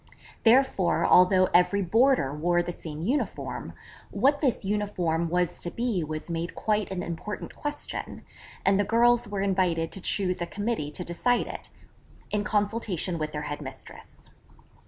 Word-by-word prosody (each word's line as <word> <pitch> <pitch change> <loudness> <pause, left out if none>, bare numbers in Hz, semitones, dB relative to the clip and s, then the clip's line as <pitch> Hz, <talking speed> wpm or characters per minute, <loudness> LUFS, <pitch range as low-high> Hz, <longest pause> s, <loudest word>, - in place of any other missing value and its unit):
Therefore 230 -6 +4
although 185 +1 +6
every 195 +3 +4
boarder 225 - +3
wore 175 +3 +1
the 175 - -4
same 160 -2 -7
uniform, 265 +10 -2 0.4
what 275 +8 +2
this 255 -8 +1
uniform 180 -5 -1
was 180 0 0
to 175 - -4
be 230 -4 -1
was 155 0 -5
made 170 0 -4
quite 210 -2 0
an 185 -2 -3
important 180 +5 -6
question: 295 0 -5 0.4
and 195 0 +4
the - - +4
girls 235 +1 +3
were 200 -1 -2
invited 180 -4 +1
to 195 - -5
choose 185 -1 0
a 175 - -1
committee 205 -7 -2
to 175 +4 -5
decide 245 +8 +1
it, - - -8 0.6
in 210 -1 0
consultation 205 -5 -1
with 155 0 -2
their 150 0 -4
head 145 0 -5
mistress. - - -11
190 Hz, 155 wpm, -27 LUFS, 170-215 Hz, 0.6 s, although